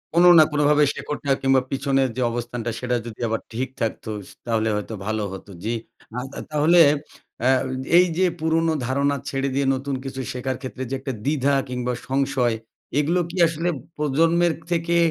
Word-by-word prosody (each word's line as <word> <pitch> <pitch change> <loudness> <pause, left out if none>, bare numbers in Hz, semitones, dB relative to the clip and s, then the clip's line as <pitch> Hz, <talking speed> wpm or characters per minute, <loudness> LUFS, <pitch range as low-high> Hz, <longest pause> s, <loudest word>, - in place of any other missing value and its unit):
কোন 170 - +6 0.2
না - - +9
কোনভাবে 150 0 +4
শেকড়টা 145 -1 -4
কিংবা 135 -1 +4
পিছনের 135 -1 +1
যে - - 0
অবস্থানটা, 120 0 -4
সেটা 125 -1 -1
যদি 115 -2 -9
আবার 115 0 -1
ঠিক 130 +3 -1
থাকতো, 110 -1 -2 0.4
তাহলে 110 -2 +1
হয়তো 105 +2 -4
ভালো 110 0 -1
হত, 95 - -9 0.2
জ্বী। 115 +2 -1 0.8
তাহলে 155 +4 +4 0.6
অ্যা 130 +2 +4 0.5
এই 180 - +7
যে 185 - +4
পুরনো 160 +1 +1
ধারণা 140 +3 +1
ছেড়ে 135 -1 -1
দিয়ে 140 0 +1
নতুন 135 +1 -3
কিছু 135 0 -4
শেখার 130 0 -3
ক্ষেত্রে 130 -1 -5
যে 135 - -1
একটা 135 0 -4
দ্বিধা 140 -1 +2 0.2
কিংবা 125 0 -2 0.2
সংশয়, 130 -3 +1 0.4
এগুলো 165 +5 +2
কি 175 - -7
আসলে 165 +2 -1 0.3
প্রজন্মের 165 +4 +2 0.2
থেকে 170 0 +1
135 Hz, 160 wpm, -23 LUFS, 125-150 Hz, 0.8 s, না